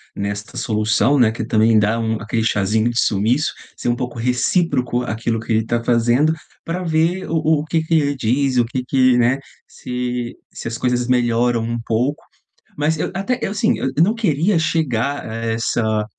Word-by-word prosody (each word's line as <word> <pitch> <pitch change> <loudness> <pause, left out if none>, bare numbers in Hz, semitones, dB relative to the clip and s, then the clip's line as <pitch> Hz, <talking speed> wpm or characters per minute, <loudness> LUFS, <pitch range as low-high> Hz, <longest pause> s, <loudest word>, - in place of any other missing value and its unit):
nesta 100 +1 -5
solução, 110 +5 +1
né, 120 -3 +5
que 115 - -6
ele 110 - -4
também 110 0 +4
dá 105 +2 +2
um 110 -1 -1
aquele 110 +1 -1
chazinho 110 +1 +1
de 120 - -4
sumiço, 115 +9 +1 0.2
ser - - -3
um 120 - +2
pouco 125 -1 -5
recíproco 125 +1 +1
àquilo 115 -1 -2
que 115 - -6
ele 110 0 +2
tá 120 0 -1
fazendo, 120 +6 +3 0.3
pra 175 +2 -3
ver 165 +3 0
o 165 - -1
o 160 -1 +2
o - - -7
que 160 0 0
que 160 - -2
ele 145 -2 +2
diz, 130 +2 0
o 120 - +4
que 125 +2 -3
que, 130 -1 +3
né, 125 +3 +2 0.3
se 125 -1 -4 0.2
se - - -7
as 115 - -4
coisas 125 0 0
melhoram 120 -1 +2
um 115 +1 -2
pouco, 125 +6 -1 0.5
mas 155 +2 +1
eu - - -1
até 220 +6 -1
eu - - -2
assim, 220 +2 +1
eu - - -1
eu 160 - +5
não 205 +5 +2
queria 180 -4 +1
chegar 145 -4 -1
a 110 - -6
essa 115 -1 -1
125 Hz, 195 wpm, -19 LUFS, 115-150 Hz, 0.5 s, né